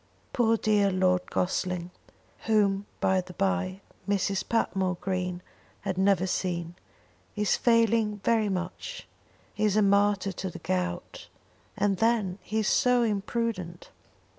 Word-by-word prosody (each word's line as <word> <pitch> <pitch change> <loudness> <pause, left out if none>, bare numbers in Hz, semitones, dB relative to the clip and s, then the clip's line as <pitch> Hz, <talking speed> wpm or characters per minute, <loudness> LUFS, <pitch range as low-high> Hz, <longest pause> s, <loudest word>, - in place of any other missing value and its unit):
Poor 230 -2 +3
dear 210 -2 +2
Lord 185 -1 +1
Gossling" 180 -1 -1 0.6
whom, 205 -2 +2
by 190 0 +2
the 180 0 -12
bye, 195 0 -1 0.3
Mrs. 200 -1 0
Patmore 190 -5 0
Green 180 -1 -3 0.4
had 190 -1 -2
never 190 -1 +3
seen 175 -2 -2 0.6
"is 210 -1 +2
failing 230 -2 +2
very 225 -3 +2
much; 185 - -5 0.5
he 215 - -3
is 210 -1 +2
a 215 - +5
martyr 200 0 +3
to 190 0 -5
the - - -8
gout, 180 0 -3 0.5
and 200 -1 +1
then 215 -4 +1
he 220 - -4
is 215 - -1
so 250 -1 +3
imprudent." 205 -4 -2
195 Hz, 130 wpm, -28 LUFS, 185-215 Hz, 0.6 s, a